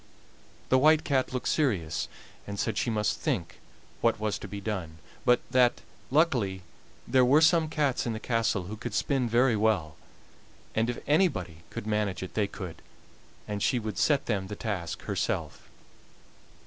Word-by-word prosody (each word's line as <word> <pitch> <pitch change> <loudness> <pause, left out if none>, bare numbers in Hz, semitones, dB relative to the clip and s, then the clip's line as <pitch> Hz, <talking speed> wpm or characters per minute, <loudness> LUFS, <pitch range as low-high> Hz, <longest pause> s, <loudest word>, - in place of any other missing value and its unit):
The 130 - +5
White 155 +3 +5
Cat 135 -3 +1
looked 125 -1 -3
serious, 95 - 0 0.4
and 100 0 -5
said 110 - 0
she - - 0
must 105 -2 0
think - - -2 0.4
what - - +2
was 110 -1 -1
to - - -7
be 100 - -6
done, 95 -6 -4 0.3
but 125 0 +4
that, 125 -1 +4 0.3
luckily, 125 - +2 0.4
there 130 -1 +4
were 135 +5 +6
some 160 0 +4
cats 145 -6 0
in 115 - -1
the 110 - -4
castle 115 -5 0
who 105 +5 -7
could 115 -1 -5
spin 135 -5 +1
very 120 +1 +4
well, 105 -8 +1 0.8
and 115 +2 +1
if 120 - -2
anybody 145 - +1
could - - -6
manage 105 -3 -1
it 95 - -7
they 105 -2 +1
could, 90 -5 -8 0.7
and 105 -1 -3
she 125 - +2
would 110 -3 -4
set 145 -3 +3
them 100 -4 -1
the 105 - -5
task 100 -6 -4
herself. - - -3
110 Hz, 165 wpm, -28 LUFS, 100-130 Hz, 0.8 s, were